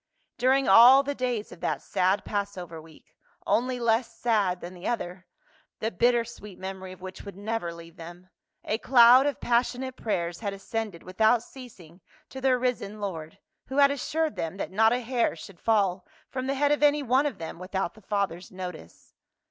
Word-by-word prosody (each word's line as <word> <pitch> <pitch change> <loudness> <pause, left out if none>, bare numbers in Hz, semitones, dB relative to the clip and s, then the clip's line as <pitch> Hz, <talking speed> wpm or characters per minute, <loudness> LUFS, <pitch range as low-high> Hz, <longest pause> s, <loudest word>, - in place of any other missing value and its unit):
During 265 +2 +3
all 245 +7 +8
the 285 +1 -2
days 250 -5 -3
of - - -12
that - - -1
sad 190 +3 +1
Passover 185 -5 -4
week 155 -1 -19 0.2
— - - -35
only 250 +2 -1
less 235 0 +1
sad 205 -6 +1
than 175 +1 -8
one 180 0 -7
other, 185 -5 -4 0.5
the 220 - -2
bitter 240 0 +2
sweet 210 -4 -11
memory 190 0 -7
of 185 - -13
which 185 0 -8
would 200 -2 -10
never 205 -4 -3
leave 170 0 -12
them 175 +2 -11 0.2
— - - -54
a 215 - -2
cloud 250 +2 +7
of 285 - -2
passion 245 +2 +1
ate 260 -1 -6
prayers 175 -6 -2
had 205 -3 -3
ascended 200 -2 -5
without 220 +5 +2
ceasing 195 - -14 0.3
to 265 - -8
their 260 -1 +3
risen 245 -4 -2
Lord, 165 -6 -5 0.3
who 265 - -5
had 280 -1 +6
assured 310 +3 -1
them 165 +3 -4
that - - -4
not 220 +3 +4
a 245 +1 0
hair 240 -5 0
should 175 +2 -12
fall 200 -5 +1 0.2
from 260 0 -3
the 275 - 0
head 290 +1 +2
of 295 - +1
any 295 0 +4
one 265 +3 +2
of 260 -9 -5
them 165 -1 -7
without 185 -1 -3
the 215 - -17
Father's 195 -3 -2
notice. 180 - -9
215 Hz, 195 wpm, -27 LUFS, 185-250 Hz, 0.5 s, all